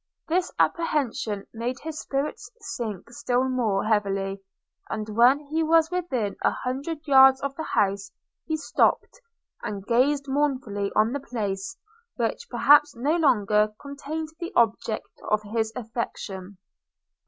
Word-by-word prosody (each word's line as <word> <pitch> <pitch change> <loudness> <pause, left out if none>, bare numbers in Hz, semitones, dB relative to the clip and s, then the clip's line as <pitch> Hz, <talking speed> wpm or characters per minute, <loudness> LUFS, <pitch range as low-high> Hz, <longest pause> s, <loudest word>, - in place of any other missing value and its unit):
This 360 +2 +1
apprehension 245 - 0
made 240 +3 -3
his 315 -1 -5
spirits 275 +2 -3
sink 230 - -5
still 245 +1 0
more 230 -7 0
heavily; 195 -2 0 0.5
and 215 0 -3
when 240 +5 +5
he 300 +2 -3
was 325 +1 +3
within 265 - -2
an - - +3
hundred 285 +5 -4
yards 265 -1 +7
of 280 -1 -3
the 315 - -5
house, 195 -8 0 0.4
he 315 - 0
stopped, - - +1 0.4
and 200 -2 -5
gazed 275 +5 +2
mournfully 260 -8 -1
on 215 +2 +3
the 285 - -2
place, 225 - -4 0.4
which 230 -2 -2
perhaps 290 +4 +5
no 280 +7 +1
longer 215 -8 +3
contained 290 +3 -5
the 345 +2 -5
object 225 -1 0
of 215 0 +2
his 220 +1 -1
affection. 205 -5 -5
250 Hz, 130 wpm, -25 LUFS, 215-290 Hz, 0.5 s, yards